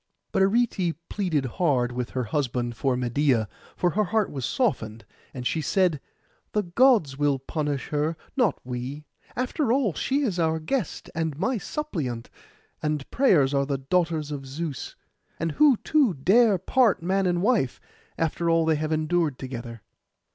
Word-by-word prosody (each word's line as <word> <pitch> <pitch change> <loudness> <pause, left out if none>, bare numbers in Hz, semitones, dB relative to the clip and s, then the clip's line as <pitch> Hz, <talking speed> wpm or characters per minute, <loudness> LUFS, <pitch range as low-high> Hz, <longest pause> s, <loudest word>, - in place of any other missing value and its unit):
But - - +1
Arete 195 -4 +2
pleaded 170 -9 0
hard 130 -2 +1
with 125 0 -3
her 130 - -2
husband 120 -1 -2
for 125 +4 0
Medeia, 125 -2 +1 0.3
for 175 - +1
her 210 +5 +1
heart 215 +2 0
was 135 -4 -3
softened. 115 - -1 0.3
And 125 -2 -7
she 160 - 0
said, 170 -1 +1 0.5
'The 210 - +1
Gods 175 - +3
will 145 -2 +2
punish 145 +1 -3
her, 150 +2 -1 0.2
not 240 - +2
we. 130 +4 -5 0.3
After 255 +1 0
all, 245 -8 +2
she 275 - 0
is 195 -9 -1
our 160 -1 +1
guest 210 - -3
and 160 -3 -2
my 235 +7 0
suppliant, 155 - -4 0.5
and 150 -2 -2
prayers 155 - +4
are 140 0 +1
the 140 -1 0
daughters 160 +1 0
of 135 -2 -5
Zeus. 145 +1 -5 0.4
And 165 0 -1
who, 280 - +5
too, 275 - +2
dare 200 - +4
part 220 0 +2
man 190 +2 +1
and 175 0 0
wife, 215 - +1 0.4
after 165 +1 0
all 165 -1 +3
they 160 -1 +2
have 155 +1 -2
endured 155 -2 +1
together? 120 -4 -7
160 Hz, 160 wpm, -25 LUFS, 135-195 Hz, 0.5 s, who